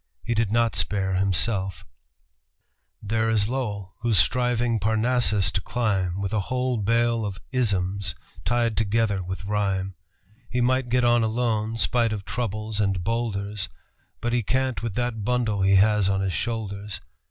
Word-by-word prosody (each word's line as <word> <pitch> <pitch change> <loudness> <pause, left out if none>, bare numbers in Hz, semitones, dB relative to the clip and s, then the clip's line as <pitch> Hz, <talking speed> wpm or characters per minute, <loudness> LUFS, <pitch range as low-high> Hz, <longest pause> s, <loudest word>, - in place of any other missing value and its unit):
He 120 - -1
did 110 -2 0
not 115 0 +2
spare 95 -2 0
himself: 95 -1 0 1.2
"There 110 +2 0
is 105 -2 +2
Lowell, 105 -7 -3
who's 115 -2 +1
striving 120 +3 +2
Parnassus 110 -1 +2
to 95 -1 -1
climb 100 -7 -1
With 100 +1 -2
a 110 - +2
whole 130 -1 0
bale 115 +2 +2
of 100 -2 -4
isms 100 -7 0 0.3
tied 120 -2 +1
together 110 -2 +1
with 95 +1 -5
rhyme. 95 -2 -1 0.6
He 125 - -1
might 130 +1 +2
get 125 0 +2
on 120 0 +4
alone, 110 -1 0
spite 115 +2 +2
of 100 -2 -5
troubles 110 -2 -3
and 95 -3 0
bowlders, 105 -2 -2 0.5
But 120 0 -1
he 120 - +2
can't 130 +3 0
with 115 -4 -4
that 120 -3 -2
bundle 115 -3 0
he 95 +1 +4
has 105 0 +4
on 95 0 +1
his 95 -2 -1
shoulders. 105 -4 -3
110 Hz, 155 wpm, -25 LUFS, 100-120 Hz, 1.2 s, on